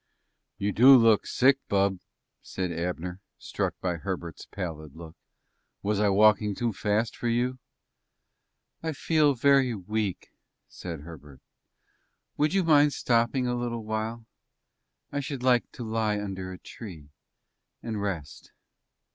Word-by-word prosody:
"You 100 +1 -1
do 130 +6 +8
look 115 -3 +4
sick, 135 +2 +3
bub," 100 -1 +1 0.4
said 90 -2 -4
Abner, 90 +2 -4 0.2
struck - - -3
by 90 -2 -1
Herbert's 85 -2 -6
pallid 80 -6 -6
look. 80 -1 -11 0.7
"Was 105 0 0
I 105 -1 +3
walking 105 0 +4
too 120 0 -1
fast 105 +4 0
for 120 - -4
you?" 125 +2 0 1.2
"I 160 -1 -2
feel 150 -1 +2
very 135 -1 +3
weak," 105 0 -3 0.4
said 85 -5 -7
Herbert. 75 -4 -12 1.0
"Would 150 +5 +1
you 195 - +3
mind 150 -3 +5
stopping 120 +2 +1
a 125 - 0
little 120 -2 -3
while? 110 +1 -4 0.9
I 145 - -2
should 140 -2 -5
like 125 -2 +3
to 120 - -7
lie 110 -2 0
under 95 -2 -5
a 90 - -8
tree 85 -8 -11 0.7
and 110 -3 -3
rest." 80 -8 -5
105 Hz, 130 wpm, -27 LUFS, 90-125 Hz, 1.2 s, do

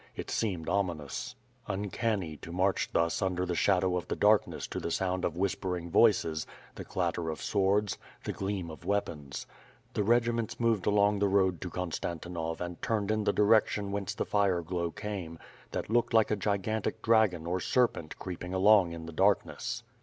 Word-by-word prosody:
It - - -6
seemed 95 -8 -1
ominous, 85 -7 -2 0.3
uncanny 100 -3 -2
to 85 - -9
march 95 +2 +1
thus 85 0 +1
imder 90 -1 0
the 90 - -2
shadow 95 0 +2
of 90 - -4
the - - -2
darkness 105 0 +3
to - - -3
the - - -3
sound 90 +1 -1
of 85 - -1
whispering 90 -2 -2
voices, 80 -9 +3 0.3
the - - -7
clatter 85 -2 -2
of 80 - -4
swords, 100 0 +1 0.2
the - - -3
gleam 95 -4 -3
of 80 - -11
weapons. 85 -8 -2 0.5
The - - 0
regiments 115 +1 +1
moved 115 -5 +1
along 105 0 +3
the 100 - +3
road 95 -3 +2
to 90 - -4
Konstan 85 -1 -3
tinov 80 -1 -4
and 90 -1 -5
turned 110 -3 0
in 110 -1 0
the 100 - +4
direction 105 -1 +3
whence 100 0 -3
the - - -1
fire 95 -4 +1
glow 85 0 -2
came, 95 -4 -5 0.3
that - - -3
looked 120 0 +2
like 110 -1 +4
a - - +3
gigantic 105 +1 -1
dragon 110 -8 +3
or 90 +2 -1
serpent 105 -7 0
creeping 90 0 -5
along 95 -2 +5
in 80 -1 -7
the 85 - -8
darkness. 95 +4 +1
95 Hz, 175 wpm, -30 LUFS, 85-105 Hz, 0.5 s, along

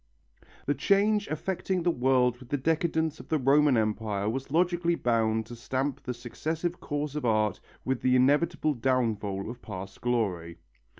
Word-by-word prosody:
The 145 - +2
change 205 - +2
affecting 180 +3 -2
the 175 - +3
world 125 -3 +2
with 125 -2 -14
the 145 - 0
decadence 160 +1 0
of - - -12
the 160 - +2
Roman 140 0 +4
Empire 105 -2 -1
was 130 +5 -3
logically 170 +2 +2
bound 110 -4 +1
to 120 - -9
stamp 130 +3 -2
the 125 - -4
successive 160 +8 -4
course 145 -1 -3
of 150 - -4
art 110 -3 +1 0.3
with 130 -1 -1
the 130 0 +3
inevitable 150 +4 +3
downfall 110 -6 -1
of 120 +2 -8
past 95 -2 -8
glory. 95 -9 -1
130 Hz, 160 wpm, -28 LUFS, 115-160 Hz, 0.3 s, Roman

